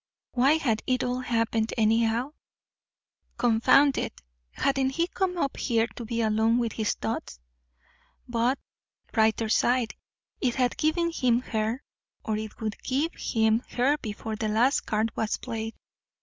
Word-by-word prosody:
Why 260 +4 +4
had 250 -9 +1
it 255 -1 +1
all 250 0 -1
happened, 230 -2 0
anyhow? 225 +4 +2 1.1
Confound 245 +4 +4
it, - - -4 0.3
hadn't 270 - +1
he 335 +6 0
come 365 0 -2
up 280 -5 -1
here 230 -3 +1
to 240 - -6
be 230 +1 -1
alone 220 +1 +2
with 235 -2 0
his 215 -2 -1
thoughts? 110 - -4 0.9
But, 240 +2 +1 0.6
brighter 220 0 +2
side, 240 +1 +2 0.5
it 245 -2 0
had 250 -2 +1
given 335 +2 +1
him 245 -6 +2
her 225 +2 -2 0.4
or 220 - 0
it 215 0 -7
would 215 -2 -4
give 285 +6 -1
him 220 0 +1
her 260 +4 +3
before 220 -1 -5
the 215 0 -2
last 240 +6 +2
card 220 +1 0
was 220 -2 -1
played. 225 -2 -5
235 Hz, 145 wpm, -27 LUFS, 220-260 Hz, 1.1 s, Why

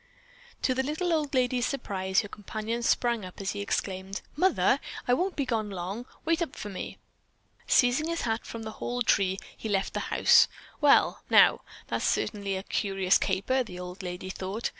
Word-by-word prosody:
'" - - -25
To 260 - +3
the 260 - +1
little 315 +6 -1
old 295 -3 0
lady's 250 -1 +2
surprise, 190 -8 0
her 205 - -7
companion 215 +3 -4
sprang 235 -1 +1
up 185 -1 -9
as 195 -1 -2
he 205 - -4
exclaimed: 195 -1 -3
"Mother, 370 +6 +3 0.3
I 245 - +4
won't 365 +8 0
be 280 - -1
gone 220 -4 -1
long. 195 +6 -5 0.2
Wait 330 +1 +2
up 330 - -2
for 210 - -6
me!" 190 - -6 0.7
Seizing 250 +5 +4
his 335 0 -2
hat 225 -1 -1
from 230 -1 -7
the 220 - -5
hall 245 0 -1
"tree," 190 -4 +2 0.2
he 220 - -6
left 195 -1 0
the - - -1
house. - - +6 0.3
"Well, 290 -1 +5
now, - - +6 0.3
that's - - -1
certainly 200 -2 -1
a 190 - -4
curious 195 -2 +1
caper," 200 +8 +1
the 180 -6 -9
old 180 +1 -7
lady 180 +1 -5
thought. 195 +5 -3
220 Hz, 185 wpm, -28 LUFS, 195-260 Hz, 0.7 s, house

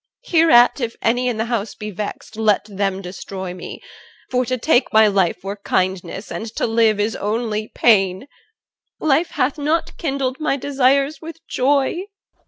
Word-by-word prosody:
Hereat 320 - +5
if 230 -1 -3
any 245 +2 +2
in 240 -3 -1
the 220 - -1
house 230 -3 -3
be 210 0 -6
vexed, 210 +2 -6
Let 215 -2 +2
them 195 -2 -2
destroy 185 0 -6
me; 180 - -9 0.5
for 250 0 +1
to 255 +1 -1
take 250 +1 +2
my 220 0 +6
life 190 -4 +1
Were 200 +1 -5
kindness, 190 0 -2
and 225 - -5
to - - 0
live 225 -2 +2
is 210 +1 0
only 215 0 -2
pain: 195 -3 +3 0.7
Life 310 +3 +2
hath 275 +4 -1
not 305 +3 -1
kindled 270 -3 -2
my 305 -3 0
desires 275 +2 +1
with 325 0 -8
joy. 280 +7 +1
230 Hz, 160 wpm, -20 LUFS, 205-275 Hz, 0.7 s, my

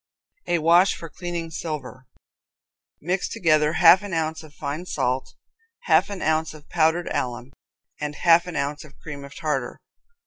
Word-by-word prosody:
A 175 - +2
Wash 170 +4 +4
for 165 -2 -9
Cleaning 170 -2 -5
Silver. 150 -5 -6 0.9
Mix 180 +4 -1
together 155 -7 +2
half 175 +2 +7
an 205 -3 -7
ounce 160 0 -2
of 155 -2 -14
fine 155 +5 -5
salt, 130 -3 -2 0.5
half 485 - +3
an 200 -2 -5
ounce 160 0 0
of 150 -1 -15
powdered 165 +1 +2
alum, 125 +1 -3 0.5
and 150 0 -4
half 170 +2 +4
an 175 - -6
ounce 145 +1 -2
of 150 -2 -17
cream 145 -3 -8
of 140 - -11
tartar. 135 -5 -3
160 Hz, 160 wpm, -24 LUFS, 145-175 Hz, 0.9 s, half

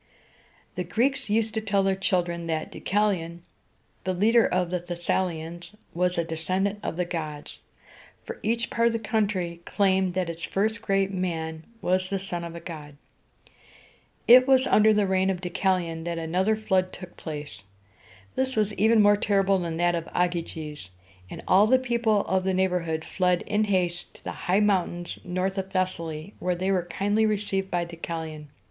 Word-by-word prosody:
The 180 - -3
Greeks 235 +7 0
used 220 +1 +1
to 220 - -1
tell 200 -2 +1
their 195 0 +2
children 175 -3 -1
that 160 -1 -2
Deu - - -9
ca´li 205 -3 +2
on, 170 +1 -10 0.6
the 185 0 -1
leader 225 +5 +4
of 180 -1 0
the 180 - 0
Thes 175 0 -7
sa´li 180 -3 +1
ans, 170 +5 -9 0.2
was 180 +1 0
a 170 - +2
descendant 185 +5 -1
of 165 - -4
the 180 - 0
gods, 155 -4 -5 0.6
for 465 -1 -8
each 230 +2 -1
part 230 0 +3
of 235 - +1
the - - +1
country 200 -6 -1
claimed 190 -2 +1
that 185 -2 0
its 170 0 -6
first 215 +3 0
great 195 -2 +1
man 160 -4 -3 0.2
was 185 +1 +1
the 200 - 0
son 180 -3 -5
of 170 0 -7
a - - -6
god. 150 -4 -9 1.3
It 255 +2 +8
was 265 -1 +5
under 215 -2 +5
the 210 -1 +3
reign 190 0 +2
of 190 -2 -1
Deucalion 175 -2 -1
that 170 -1 -2
another 180 +6 +1
flood 190 -4 0
took 180 -2 -10
place. 150 - -7 0.7
This 260 0 -1
was 215 -1 +1
even 220 +2 +4
more 205 0 +6
terrible 195 -1 +2
than 165 -2 -3
that 175 0 +2
of 170 -1 -3
Ogyges; 165 - -2 0.4
and - - -8
all 200 +3 +6
the 260 +3 +5
people 235 -4 +1
of 190 0 +1
the 190 0 0
neighborhood 180 -4 0
fled 180 -2 +1
in 210 +1 +1
haste 180 -3 -1
to - - -15
the - - -4
high 190 +4 +1
mountains 180 -4 0
north 185 +2 -2
of 190 0 -4
Thes´sa 185 -2 0
ly, 155 +4 -7
where 180 0 0
they 185 +2 -1
were 180 -3 +1
kindly 205 +5 +1
received 200 -2 -1
by 175 -2 0
Deucalion. 160 -2 -6
185 Hz, 185 wpm, -26 LUFS, 170-205 Hz, 1.3 s, It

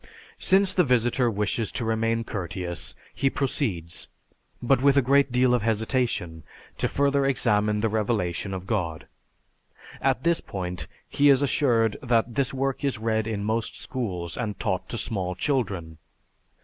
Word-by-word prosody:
Since 190 0 +4
the 180 - +4
visitor 125 -2 +2
wishes 105 +1 -1
to 120 - -2
remain 115 +1 0
courteous 90 -4 -5 0.2
he 135 - +1
proceeds, 110 - -2 0.5
but 125 +1 +2
with 140 0 +4
a - - +7
great 140 +1 +3
deal 125 0 +3
of 125 - +2
hesitation, 110 -6 -1 0.4
to - - +2
further 140 0 +1
examine 105 -5 +1
the 115 - +2
revelation 105 -4 -1
of 95 -1 -5
God. 85 -7 -2 1.0
At 125 - +1
this 170 0 +2
point 90 -2 -5 0.2
he 145 0 +3
is 135 0 +5
assured 120 -6 +2
that 120 -3 +1
this 135 +2 +1
work 135 0 -2
is 140 -4 0
read 110 0 0
in 105 -2 -2
most 110 +2 -2
schools 90 -10 -4
and 105 -4 -3
taught 95 -5 -2
to 115 - -4
small 95 -5 -1
children. 95 - -2
115 Hz, 150 wpm, -26 LUFS, 100-130 Hz, 1.0 s, a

